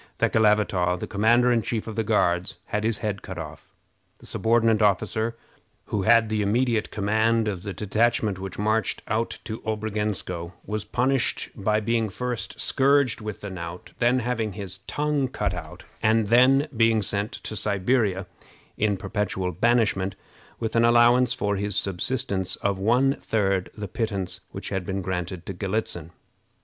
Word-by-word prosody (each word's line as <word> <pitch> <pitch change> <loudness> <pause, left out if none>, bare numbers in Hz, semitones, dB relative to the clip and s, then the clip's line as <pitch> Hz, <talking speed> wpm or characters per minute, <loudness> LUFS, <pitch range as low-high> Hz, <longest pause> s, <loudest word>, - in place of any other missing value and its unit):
Thekelavitaw, 100 -5 +2
the - - -3
commander 115 +4 +3
in 120 -1 +3
chief 110 0 -3
of 110 - -6
the 115 - 0
Guards, 90 -5 +1
had 105 - -2
his 110 -1 +1
head 100 -2 -2
cut 95 - -8
off. 80 -2 -8 0.5
The - - -16
subordinate 115 -1 +2
officer 110 +3 +1 0.5
who 105 - -2
had 115 +2 +5
the 110 -1 0
immediate 115 +2 +1
command 110 +2 +1
of 95 -4 -2
the 100 - -5
detachment 105 0 0
which 95 -1 -6
marched 110 0 0
out 110 +2 -1
to 110 -1 -6
Obrogensko 105 -5 -3
was 105 0 -3
punished 125 +3 0
by 105 0 0
being 115 0 0
first 125 +3 -4
scourged 140 -3 +2
with 105 -2 -6
the 100 - -6
knout, 85 -1 -7
then 125 +1 +3
having 115 -3 -2
his 95 -2 -5
tongue 150 -2 0
cut - - -2
out, - - -8 0.2
and 110 -1 +2
then 130 +5 +5
being 115 -1 +3
sent 105 +5 0
to 110 - -7
Siberia 100 -1 +1 0.5
in 105 -2 +1
perpetual 95 -2 -2
banishment, 100 -1 +1 0.4
with 115 -1 -3
an 115 - +4
allowance 120 +1 +5
for 100 0 -1
his 100 0 -2
subsistence 95 -1 0
of 100 -1 -1
one 125 +7 +3
third 95 -4 0
the 105 -1 -4
pittance 95 -4 -3
which 95 - -6
had 95 -2 -2
been 95 0 -3
granted 90 -1 -4
to 95 - -5
Galitzin. 95 -3 -3
105 Hz, 160 wpm, -25 LUFS, 95-115 Hz, 0.5 s, had